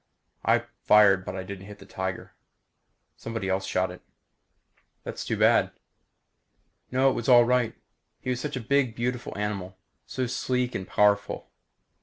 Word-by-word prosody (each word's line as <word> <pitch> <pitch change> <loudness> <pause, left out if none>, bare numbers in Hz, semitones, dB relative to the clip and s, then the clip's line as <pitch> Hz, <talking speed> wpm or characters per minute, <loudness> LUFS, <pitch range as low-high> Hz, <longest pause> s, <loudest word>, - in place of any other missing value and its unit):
I - - +3 0.2
fired 100 -3 +6
but 95 - -6
I 95 - -4
didn't 95 0 -8
hit 105 -1 -10
the 100 - -14
tiger. 95 -1 -5 0.8
Somebody 115 -4 -4
else 95 +1 0
shot 95 0 0
it." 90 - -11 1.0
"That - - -4
was - - -6
too - - -1
bad." - - +4 1.2
"No, 130 +1 +3
it - - -2
was 120 - -3
all 120 -1 +8
right. 125 -2 +1 0.4
He 130 - -3
was 125 - -2
such 150 - -4
a 125 - -3
big 130 -1 +1
beautiful 125 -1 -3
animal. 100 -3 -4 0.3
So 130 - -2
sleek 125 0 -1
and 95 - -4
powerful." 105 0 +1
105 Hz, 160 wpm, -27 LUFS, 95-125 Hz, 1.2 s, all